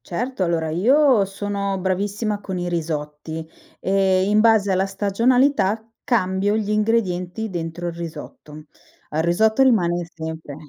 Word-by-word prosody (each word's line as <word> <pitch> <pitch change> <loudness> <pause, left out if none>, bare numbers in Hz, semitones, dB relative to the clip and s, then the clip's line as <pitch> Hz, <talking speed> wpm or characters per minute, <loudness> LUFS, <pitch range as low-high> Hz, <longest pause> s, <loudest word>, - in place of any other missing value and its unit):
Certo, 245 +4 -4
allora 165 -2 -1
io 250 - +4
sono 200 0 -3
bravissima 205 +3 -2
con 190 -2 -5
i 175 0 -3
risotti 160 -1 -4 0.3
e 190 -1 +2
in 210 +1 +4
base 215 -3 +4
alla 190 +1 +1
stagionalità 220 +3 +1 0.2
cambio 200 -4 +1
gli 210 -1 -2
ingredienti 210 -2 0
dentro 175 0 -4
il - - -4
risotto. 155 -2 -9 0.5
Al 155 +1 0
risotto 220 +9 +3
rimane 175 -9 +2
sempre 160 -3 -7
195 Hz, 130 wpm, -22 LUFS, 170-215 Hz, 0.5 s, io